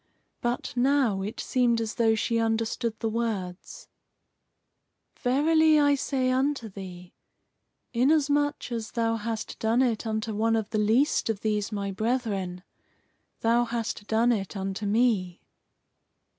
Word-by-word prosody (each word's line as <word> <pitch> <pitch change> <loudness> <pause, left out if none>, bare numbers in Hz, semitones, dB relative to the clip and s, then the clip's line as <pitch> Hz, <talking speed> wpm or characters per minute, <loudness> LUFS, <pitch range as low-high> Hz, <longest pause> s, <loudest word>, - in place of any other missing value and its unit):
But 240 +1 -2
now 250 -5 +2
it 205 +3 -5
seemed 240 -2 +1
as 225 -1 -3
though 225 -2 +3
she 230 +1 0
understood 225 +1 -1
the 225 - -1
words: 215 -5 -4 1.3
"Verily 310 +4 +4
I 285 -1 +4
say 260 -2 0
unto 260 -3 0
thee, 180 -2 -10 0.8
Inasmuch 290 +2 +2
as 225 -2 -4
thou 230 -1 +1
hast 225 0 -5
done 230 +3 +2
it 230 -2 -1
unto 220 0 -2
one 225 +2 +1
of 220 -2 -2
the 215 - 0
least 225 +6 +2
of 215 -3 -2
these 210 -1 -1
my 200 -1 -3
brethren, 200 -5 -2 0.8
thou 235 +1 +3
hast 230 -3 -4
done 230 +2 +3
it 200 -3 -2
unto 195 +2 -3
me." 205 -5 +1
225 Hz, 130 wpm, -27 LUFS, 210-250 Hz, 1.3 s, Verily